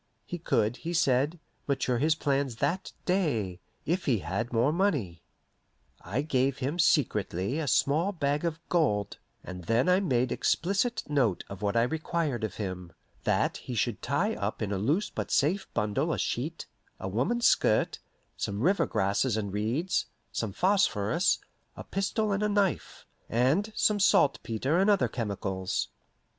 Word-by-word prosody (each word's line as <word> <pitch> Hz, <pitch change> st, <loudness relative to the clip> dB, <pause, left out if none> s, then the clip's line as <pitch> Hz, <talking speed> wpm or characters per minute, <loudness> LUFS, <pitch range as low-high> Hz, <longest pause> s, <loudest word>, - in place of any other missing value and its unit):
He 175 Hz, -, -5 dB
could, 115 Hz, -7 st, +1 dB
he 170 Hz, +1 st, -5 dB
said, 145 Hz, +1 st, +2 dB, 0.3 s
mature 130 Hz, -3 st, 0 dB
his 155 Hz, +3 st, +3 dB
plans 140 Hz, -4 st, 0 dB
that 145 Hz, +10 st, -1 dB
day, 120 Hz, -, 0 dB, 0.3 s
if 175 Hz, +4 st, -1 dB
he 130 Hz, -6 st, +3 dB
had 100 Hz, +8 st, -3 dB
more 120 Hz, +5 st, +2 dB
money. 140 Hz, -, 0 dB, 0.8 s
I 120 Hz, +10 st, -2 dB
gave 135 Hz, -3 st, +1 dB
him 140 Hz, +6 st, -3 dB
secretly 110 Hz, -, +1 dB
a 155 Hz, -, -2 dB
small 150 Hz, +7 st, +2 dB
bag 145 Hz, -4 st, -1 dB
of 165 Hz, -1 st, -2 dB
gold, 105 Hz, -, 0 dB, 0.2 s
and 90 Hz, -2 st, -8 dB
then 115 Hz, +6 st, +2 dB
I 180 Hz, +1 st, +5 dB
made 130 Hz, -10 st, +1 dB
explicit 200 Hz, +6 st, 0 dB
note 130 Hz, -, +1 dB
of 100 Hz, 0 st, -8 dB
what 105 Hz, +2 st, 0 dB
I 115 Hz, -, +5 dB
required 155 Hz, -2 st, -1 dB
of 110 Hz, -, -3 dB
him: 90 Hz, -4 st, -5 dB, 0.3 s
that -, -, +1 dB
he 125 Hz, -, -6 dB
should 115 Hz, -2 st, -1 dB
tie -, -, 0 dB
up 100 Hz, +1 st, -3 dB
in 105 Hz, -, -2 dB
a 100 Hz, -, -1 dB
loose 155 Hz, -, 0 dB
but -, -, -4 dB
safe 180 Hz, +8 st, +1 dB
bundle 135 Hz, +10 st, 0 dB
a -, -, -1 dB
sheet, 155 Hz, +8 st, -2 dB, 0.3 s
a -, -, -4 dB
woman's 135 Hz, -, 0 dB
skirt, 110 Hz, -, +3 dB, 0.4 s
some 100 Hz, +1 st, -3 dB
river 190 Hz, +8 st, +3 dB
grasses 100 Hz, +4 st, +1 dB
and 100 Hz, -3 st, -3 dB
reeds, 120 Hz, -, 0 dB, 0.2 s
some 110 Hz, -3 st, -2 dB
phosphorus, 175 Hz, -, +2 dB, 0.4 s
a -, -, -6 dB
pistol 205 Hz, +2 st, -1 dB
and 200 Hz, +1 st, 0 dB
a 210 Hz, -, +1 dB
knife, 200 Hz, -3 st, -1 dB, 0.2 s
and 140 Hz, -, +2 dB
some 210 Hz, -1 st, +2 dB
saltpetre 140 Hz, -, +2 dB
and 195 Hz, +2 st, +3 dB
other 200 Hz, -2 st, +4 dB
chemicals. 100 Hz, -4 st, -3 dB
135 Hz, 155 wpm, -29 LUFS, 105-170 Hz, 0.8 s, I